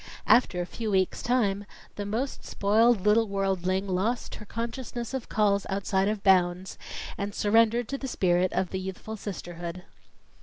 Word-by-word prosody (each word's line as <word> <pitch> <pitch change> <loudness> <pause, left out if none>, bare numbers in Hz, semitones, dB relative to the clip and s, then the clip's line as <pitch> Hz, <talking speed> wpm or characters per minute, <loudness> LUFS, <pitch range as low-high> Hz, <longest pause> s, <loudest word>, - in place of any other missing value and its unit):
After 230 -7 +4
a - - -2
few 220 +4 -4
weeks' 190 -2 +1
time, 205 -5 +1 0.3
the 205 -1 -4
most 240 +7 -3
spoiled 220 +2 +3
little 220 +2 +4
worldling 195 -1 0
lost 200 +6 -1
her - - -9
consciousness 235 +1 -5
of 265 -3 -4
calls 200 -2 +2
outside 195 0 0
of 210 -1 -2
"bounds," 185 -1 +2 0.4
and 200 0 -3
surrendered 225 +2 +3
to 275 - -3
the 270 - -4
spirit 185 -5 +2
of 185 - -1
the 190 - -2
youthful 190 +3 -6
sisterhood. 175 -3 -6
200 Hz, 155 wpm, -27 LUFS, 190-230 Hz, 0.4 s, After